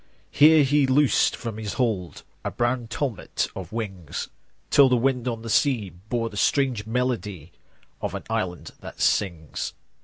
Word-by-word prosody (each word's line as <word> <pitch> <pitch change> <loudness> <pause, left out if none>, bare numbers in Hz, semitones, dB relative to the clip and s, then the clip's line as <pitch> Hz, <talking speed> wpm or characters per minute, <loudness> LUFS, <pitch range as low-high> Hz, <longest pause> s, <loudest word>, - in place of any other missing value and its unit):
5 - - -15
Here 155 +1 +8
He 140 0 +3
loosed 140 +1 +3
from 110 -2 -6
His 105 -3 -4
hold 105 -9 -2 0.2
A - - -1
brown 120 0 -1
tumult 120 -1 -2
of 95 -3 -7
wings, 95 -8 -5 0.4
Till 140 -2 +7
the 125 - +3
wind 125 0 0
on 115 -2 -3
the - - -7
sea 115 -7 +2
Bore 110 +7 -4
the 100 - -8
strange 125 -4 +1
melody 105 - -2 0.5
Of - - -3
an - - -5
island 95 -6 -3
that - - -10
sings. 85 -7 0
115 Hz, 160 wpm, -25 LUFS, 100-130 Hz, 0.5 s, Here